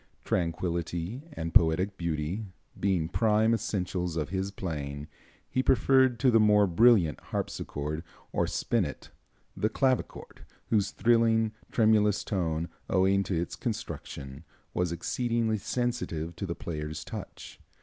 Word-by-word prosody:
Tranquillity 85 - -2
and 80 0 -4
poetic 90 +4 +4
beauty 85 +4 -2 0.3
being 95 -5 +1
prime 110 +4 +3
essentials 90 -6 -2
of 75 - -2
his 95 +1 -2
playing, 75 -7 -5 0.4
he 130 - 0
preferred 130 -1 +4
to 130 - +5
the 115 - +5
more 105 -1 +5
brilliant 95 -3 +4
harpsichord, 75 +3 -4 0.3
or - - +1
spinet, - - -2 0.4
the 110 - 0
clavichord, 130 +2 -1 0.3
whose 105 -3 +3
thrilling, 115 -1 +3 0.2
tremulous 110 -3 +3
tone, 85 -4 -1 0.2
owing 95 +1 +3
to 90 -3 -1
its 85 - -3
construction, 70 +3 -5 0.3
was 90 -1 0
exceedingly 115 +4 0
sensitive 105 -8 -2
to 100 - -4
the 85 - -3
player's 75 -2 -5
touch. - - -8
95 Hz, 120 wpm, -29 LUFS, 85-110 Hz, 0.4 s, to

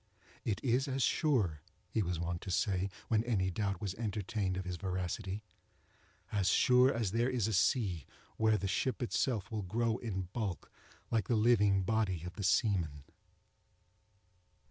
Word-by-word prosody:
"It 105 -3 -1
is 130 +2 +2
as 135 -1 0
sure," 105 - +1 0.3
he 110 - 0
was 90 -3 -2
wont 85 0 -3
to - - -7
say, 95 +1 +1 0.2
when 110 -1 +2
any 100 -6 0
doubt 100 -1 -1
was 100 -3 -3
entertained 100 -2 -2
of 95 - -4
his 90 0 -3
veracity, 95 +2 -3 0.9
"as 100 -2 +2
sure 125 +6 +5
as 115 -5 -1
there 120 +3 +1
is 125 -5 0
a 110 - -1
sea 95 - +1 0.3
where 110 -1 +3
the 100 - -2
ship 125 +6 -1
itself 115 -4 -1
will 110 -1 -2
grow 115 +4 0
in 95 -6 -4
bulk 105 -6 -3 0.4
like 110 -4 +1
the 120 - +2
living 105 -4 +4
body 95 -5 0
of 90 - -6
the 100 - -6
seaman." 85 - +1
105 Hz, 160 wpm, -33 LUFS, 95-115 Hz, 0.9 s, sure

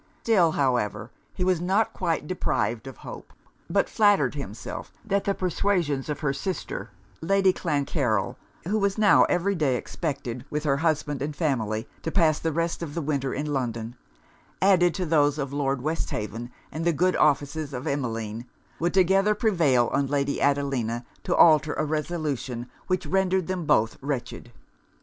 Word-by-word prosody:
Still, 180 -8 +4
however, 125 -4 0 0.2
he 180 - -1
was 180 -2 +2
not 195 +5 +1
quite 165 -4 -1
deprived 135 -8 -1
of 130 - -9
hope; - - -10 0.4
but - - +2
flattered 205 - +3
himself 115 -7 -7
that 200 -2 0
the 200 - +1
persuasions 175 -6 0
of 150 - -3
her 140 -3 +1
sister, 180 +7 -4 0.3
Lady 195 +2 +3
Clancarryl 135 - 0 0.3
(who 215 +3 +1
was 200 0 0
now 210 -2 +6
every 180 +3 +1
day 150 -8 +1
expected, 130 -3 -4
with 150 0 -2
her 140 -3 +2
husband 150 -3 0
and 145 +1 -3
family, 115 -9 -1
to - - -3
pass 160 -3 +3
the 165 - -1
rest 165 +2 -1
of 150 -4 -5
the 170 - -1
winter 140 -2 -1
in 145 +1 -2
London) 120 -3 -3 0.6
added 180 -3 +4
to 185 - -1
those 150 -2 +3
of 140 -2 -3
Lord 135 -2 -1
Westhaven, 120 -6 -3 0.2
and 160 - -4
the 170 0 +2
good 180 +5 +2
offices 145 0 +1
of 130 +1 -5
Emmeline, 115 -5 -3 0.3
would 175 +3 0
together 195 +3 +4
prevail 165 - +3
on 140 - +1
Lady 140 0 -1
Adelina 135 -5 0 0.2
to - - +1
alter 155 -2 +6
a 155 - 0
resolution 150 -6 -3 0.2
which 185 0 0
rendered 190 -1 +1
them 185 -2 -3
both 110 +1 +2
wretched. 135 -3 -4
150 Hz, 160 wpm, -26 LUFS, 135-180 Hz, 0.6 s, now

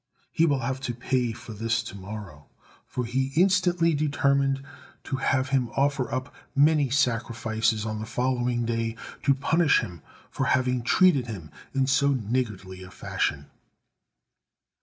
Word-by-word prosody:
He 165 - +3
will 140 -3 +1
have 130 +3 -2
to 120 -3 -4
pay 125 0 0
for 115 0 -9
this 115 +2 0
to 115 - -8
morrow," 95 -7 -9 0.4
for 125 - -3
he 130 +3 -1
instantly 175 -2 +3
determined 140 -2 +1 0.4
to 135 - -3
have 130 +1 +1
him 130 -4 +1
offer 135 -3 +1
up 130 +3 -3 0.2
many 145 -1 +4
sacrifices 115 -4 0
on 110 -1 -3
the 110 - -5
following 120 0 0
day 115 -1 -1 0.3
to 140 -1 +3
punish 160 +4 +3
him 85 -4 -8 0.3
for - - -1
having 125 -1 +2
treated 140 0 +4
him 90 -9 -7 0.2
in 135 -1 +3
so 140 +1 +3
niggardly 105 -6 -3
a 90 - -10
fashion. 70 -6 -3
125 Hz, 145 wpm, -26 LUFS, 115-140 Hz, 0.4 s, many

